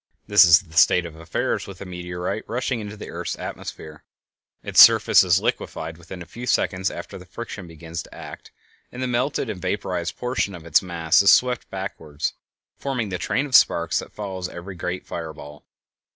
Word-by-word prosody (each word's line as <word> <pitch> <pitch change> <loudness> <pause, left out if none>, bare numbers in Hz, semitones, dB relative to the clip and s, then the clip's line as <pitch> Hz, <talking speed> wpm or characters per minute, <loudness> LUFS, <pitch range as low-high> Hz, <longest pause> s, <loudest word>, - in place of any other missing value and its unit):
This 105 -2 +7
is 85 +1 +7
the 80 -4 -12
state 90 +1 +5
of 85 -2 -8
affairs 80 0 -2
with 100 -1 -10
a - - -7
meteorite 90 +2 -5
rushing 125 +1 -1
into 105 0 -7
the - - -8
earth's - - -4
atmosphere; 75 -1 -8 0.6
its - - +6
surface - - +7
is 90 0 +3
liquefied 80 -3 -3
within 90 +1 -9
a - - -14
few 120 +9 -8
seconds 95 -4 +1
after - - -8
the - - -13
friction 95 - -8
begins 80 0 -7
to - - -14
act, - - -10 0.4
and 125 +1 -5
the - - 0
melted 125 +3 -1
and 100 -5 -5
vaporized 90 -2 -2
portion 125 -6 -2
of 85 -2 -11
its 80 -2 +4
mass 85 -2 +2
is 100 - +5
swept 125 +2 +3
backward, 80 -6 -7 0.6
forming 125 -6 -2
the 90 -1 -4
train 130 - 0
of 140 - -9
sparks 85 0 +4
that - - -9
follows 95 -3 -5
every 90 +3 -8
great 90 +1 -4
fire 80 -2 -6
ball. 75 -1 -12
90 Hz, 190 wpm, -23 LUFS, 85-105 Hz, 0.6 s, This